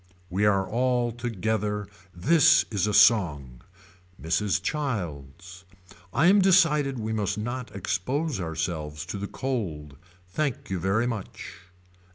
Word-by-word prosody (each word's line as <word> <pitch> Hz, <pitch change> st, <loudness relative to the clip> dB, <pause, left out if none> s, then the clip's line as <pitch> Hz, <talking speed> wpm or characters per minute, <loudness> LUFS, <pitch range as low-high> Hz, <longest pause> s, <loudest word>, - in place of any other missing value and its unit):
We 100 Hz, +3 st, +1 dB
are 95 Hz, -2 st, +2 dB
all 125 Hz, 0 st, 0 dB
together. 110 Hz, -3 st, -2 dB, 0.2 s
This 145 Hz, -, +4 dB
is 100 Hz, -1 st, 0 dB
a -, -, 0 dB
song. 75 Hz, -, +3 dB, 0.6 s
Mrs. 90 Hz, +4 st, 0 dB
Childs. 90 Hz, -, -5 dB, 0.5 s
I 140 Hz, -, +2 dB
am 195 Hz, +3 st, +6 dB
decided 155 Hz, -8 st, +3 dB
we 110 Hz, -1 st, -3 dB
must 105 Hz, -2 st, -1 dB
not 120 Hz, +1 st, -5 dB
expose 125 Hz, -, -2 dB
ourselves 80 Hz, -3 st, -4 dB
to 100 Hz, -, -6 dB
the 100 Hz, -, -4 dB
cold. 85 Hz, -, -4 dB, 0.3 s
Thank 135 Hz, +3 st, -3 dB
you 95 Hz, -, -1 dB
very 95 Hz, +6 st, +1 dB
much. 115 Hz, -5 st, -6 dB
105 Hz, 125 wpm, -26 LUFS, 90-125 Hz, 0.6 s, am